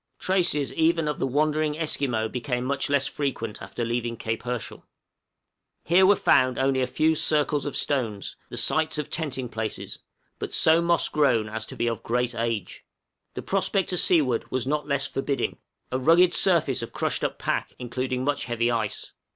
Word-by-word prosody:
Traces 175 -7 0
even 165 -1 +2
of 150 - -2
the - - 0
wandering 150 +2 0
Esquimaux 135 -8 0
became 125 +1 -3
much 140 +1 -1
less 140 -1 +2
frequent 125 -7 -3
after 95 +5 -4
leaving 120 0 -2
Cape 110 +1 -3
Herschel. 125 -1 -5 1.0
Here 185 +3 +5
were 205 - +6
found 130 -7 +3
only 135 0 +1
a 130 - +1
few 155 +5 +2
circles 150 -2 +1
of 145 - -4
stones, 115 -8 -1
the - - -7
sites 160 0 +1
of 150 - -4
tenting 135 -6 -2
places, 110 -1 -5 0.4
but - - -5
so 160 +1 +5
moss 170 0 +3
grown 125 -8 +2
as 110 0 -4
to - - -7
be - - -1
of 115 -2 -2
great 125 +1 -1
age. 115 -5 -3 0.5
The - - -5
prospect 195 -1 0
to 180 - -1
seaward 145 -10 +2
was 130 -1 -2
not 150 +2 -1
less 140 -1 0
forbidding 135 0 -2 0.3
a 130 - 0
rugged 170 +6 +5
surface 160 -10 +3
of 115 - -7
crushed - - -1
up - - -1
pack, - - -2
including 125 +1 -3
much 145 -1 -1
heavy 120 0 0
ice. 110 -3 -3
135 Hz, 175 wpm, -25 LUFS, 120-155 Hz, 1.0 s, were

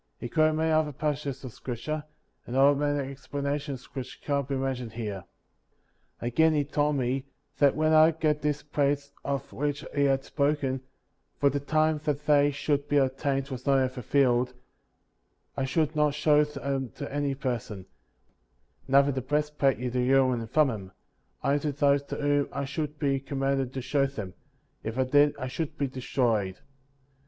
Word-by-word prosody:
He 120 - -6
quoted 155 +5 +3
many 160 +1 +1
other 155 -1 +2
passages 145 -2 -3
of 125 -4 -7
scripture, 150 +5 -4 0.4
and 125 - -3
offered 140 +1 +5
many 145 -2 -1
expla 140 +1 -6
nations 140 -2 -3
which 130 -2 -6
cannot 140 -2 0
be 140 - -1
mentioned 130 -4 -3
here. 105 -5 -5 1.0
42. - - -4
Again, 160 +7 +3
he 145 -1 +1
told 145 +1 +1
me, 130 0 -1 0.3
that 140 -2 +5
when 155 0 +2
I 155 +1 +7
got 155 -2 0
those 150 -1 -1
plated 145 -1 0
of 140 -2 -3
which 145 +1 -2
he 145 -1 +2
had 135 -1 +2
spoken 140 -3 0 0.3
— - - -46
for 140 -1 +4
the 145 - -1
time 155 +1 +1
that 150 0 -1
they 145 -1 +5
should 145 0 -1
be 145 - +3
obtained 135 0 0
was 130 0 -7
not 135 -1 +5
yet 130 -1 +1
fulfilled 125 -1 +1 0.5
— - - -46
I 135 - -1
should 155 +3 0
not 150 -1 +2
show 150 0 +4
them 140 -3 -3
to 140 -2 -6
any 145 -1 0
person; 120 -8 -4 1.0
neither 140 +1 +5
the 130 -1 -2
breastplate 150 0 +1
with 125 0 -4
the 125 - +1
Urim 130 +1 +4
and 115 -1 -6
Thummim; 110 -11 +1 0.5
only 140 +1 +2
to 145 0 -2
those 140 0 +3
to - - -5
whom 145 -1 +1
I 140 0 -3
should 150 +2 -4
be 140 -2 +1
commanded 135 -1 -1
to 130 - -3
show 140 +1 +2
them; 105 -9 -7 0.5
if 110 +2 -4
I 130 - +3
did 145 +3 +4
I - - -4
should 150 +4 -4
be 140 - 0
destroyed. 120 -7 -1
140 Hz, 180 wpm, -28 LUFS, 130-145 Hz, 1.0 s, I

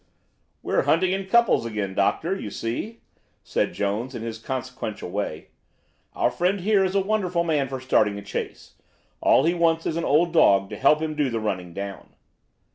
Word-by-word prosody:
"We're - - +1
hunting 180 +3 +3
in 195 0 -2
couples 235 - +4
again, 105 -4 -3
Doctor, 160 - +1
you 110 - -6
see," 125 - -5 0.4
said - - -1
Jones 110 +6 -2
in 115 - -5
his 115 -1 -5
consequential 115 -6 -5
way. 95 -6 -4 0.6
"Our - - +1
friend 185 +2 0
here 200 0 +3
is 190 +1 -1
a 195 - +4
wonderful 190 -4 0
man 150 -5 0
for 130 0 -5
starting 105 -5 +2
a 100 - -7
chase. - - -6 0.5
All - - +5
he 165 +3 +2
wants 165 -1 +1
is 160 - -1
an 170 - -1
old 165 +4 +2
dog 100 - +4
to - - -4
help 150 +3 +3
him 155 -1 -3
to 150 - +1
do - - 0
the 115 -2 -2
running 95 -5 -3
down." 100 -1 -7
140 Hz, 190 wpm, -24 LUFS, 105-175 Hz, 0.6 s, All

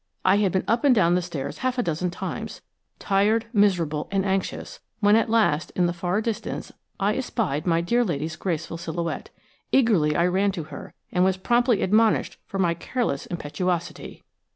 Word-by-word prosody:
I 190 +2 +5
had 200 -3 +2
been 190 - 0
up 230 +4 +1
and 275 -3 +5
down 175 -5 +4
the 180 - +2
stairs 165 -6 -5
half 255 0 -1
a 245 - +1
dozen 170 +1 -1
times, 175 - -6 0.4
tired, 210 +3 +2
miserable, 175 -8 +2
and 195 -1 0
anxious, 195 - -2 0.2
when 205 -1 +5
at 225 0 +2
last, 215 -9 +2
in 180 - +2
the 175 - 0
far 175 +4 -1
distance, 225 -1 -4 0.3
I 200 +2 +2
espied 200 - -2
my 165 -1 +3
dear 235 +8 +2
lady's 160 -4 -3
graceful 165 -2 -3
silhouette. 170 0 -4 0.4
Eagerly 205 - +3
I 170 - +3
ran 190 +3 +2
to 170 -4 -4
her, 150 -1 -10 0.2
and 180 - +2
was 190 0 +2
promptly 240 +3 +2
admonished 215 +3 +2
for 195 - -5
my 175 -3 +2
careless 170 - -2
impetuosity. 175 +1 -4
185 Hz, 175 wpm, -24 LUFS, 170-220 Hz, 0.4 s, I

